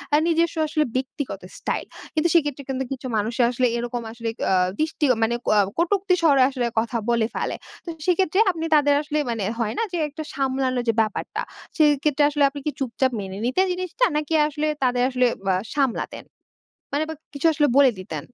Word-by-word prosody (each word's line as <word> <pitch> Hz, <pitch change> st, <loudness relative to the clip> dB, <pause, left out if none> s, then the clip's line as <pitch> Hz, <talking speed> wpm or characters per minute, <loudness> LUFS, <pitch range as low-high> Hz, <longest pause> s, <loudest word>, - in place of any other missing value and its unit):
আ -, -, +6 dB
নিজস্ব 335 Hz, 0 st, +2 dB
আসলে 310 Hz, 0 st, +1 dB
ব্যক্তিগত 260 Hz, -5 st, -3 dB, 0.2 s
স্টাইল। -, -, -2 dB, 0.3 s
কিন্তু 315 Hz, +1 st, +2 dB
সেক্ষেত্রে 290 Hz, -4 st, +1 dB
কিন্তু 265 Hz, 0 st, -1 dB
কিছু 260 Hz, -1 st, -4 dB
মানুষের 230 Hz, +3 st, +1 dB
আসলে 250 Hz, 0 st, +2 dB
এরকম 240 Hz, 0 st, -3 dB
আসলে 230 Hz, 0 st, -4 dB, 0.2 s
আ -, -, +4 dB, 0.3 s
দৃষ্টি 310 Hz, -1 st, 0 dB
আ -, -, -3 dB
মানে 235 Hz, +2 st, +1 dB
ক -, -, +3 dB, 0.3 s
কটুক্তির 365 Hz, +2 st, +2 dB
স্বরে 280 Hz, -5 st, +5 dB
আসলে 255 Hz, -3 st, -2 dB
কথা 235 Hz, +1 st, -1 dB
বলে 230 Hz, -2 st, +2 dB
ফেলে। -, -, -2 dB, 0.3 s
তো 340 Hz, -, -6 dB, 0.2 s
সেক্ষেত্রে 370 Hz, +1 st, +2 dB
আপনি 325 Hz, -1 st, -4 dB
তাদের 290 Hz, -1 st, +4 dB
আসলে, 305 Hz, 0 st, -3 dB
মানে 225 Hz, -4 st, -2 dB, 0.2 s
হয় 220 Hz, -1 st, 0 dB
না -, -, +2 dB
যে, 350 Hz, -, -2 dB
একটু 295 Hz, +2 st, -8 dB
সামলানোর 260 Hz, -2 st, 0 dB
যে -, -, +4 dB
ব্যাপারটা, 215 Hz, -2 st, -3 dB, 0.4 s
সেক্ষেত্রে 295 Hz, -1 st, +3 dB
আসলে 290 Hz, -1 st, +1 dB
আপনি 285 Hz, +1 st, -8 dB
কি 300 Hz, -, 0 dB
চুপচাপ 260 Hz, 0 st, 0 dB
মেনে 195 Hz, -1 st, -6 dB
নিতেন 320 Hz, +10 st, +2 dB
জিনিসটা? 370 Hz, +7 st, 0 dB
নাকি 305 Hz, +1 st, -2 dB
আসলে 300 Hz, +1 st, -2 dB, 0.2 s
তাদের 245 Hz, -1 st, +2 dB
আসলে 250 Hz, -1 st, +2 dB, 0.3 s
আ -, -, +2 dB, 0.2 s
সামলাতেন? 270 Hz, -5 st, -1 dB, 0.7 s
মানে, 295 Hz, -, +1 dB
বা -, -, -3 dB, 0.2 s
কিছু 285 Hz, +3 st, +1 dB
আসলে 295 Hz, -1 st, +3 dB
বলে 275 Hz, -2 st, +7 dB
দিতেন? 160 Hz, -4 st, -5 dB
280 Hz, 185 wpm, -23 LUFS, 245-310 Hz, 0.7 s, বলে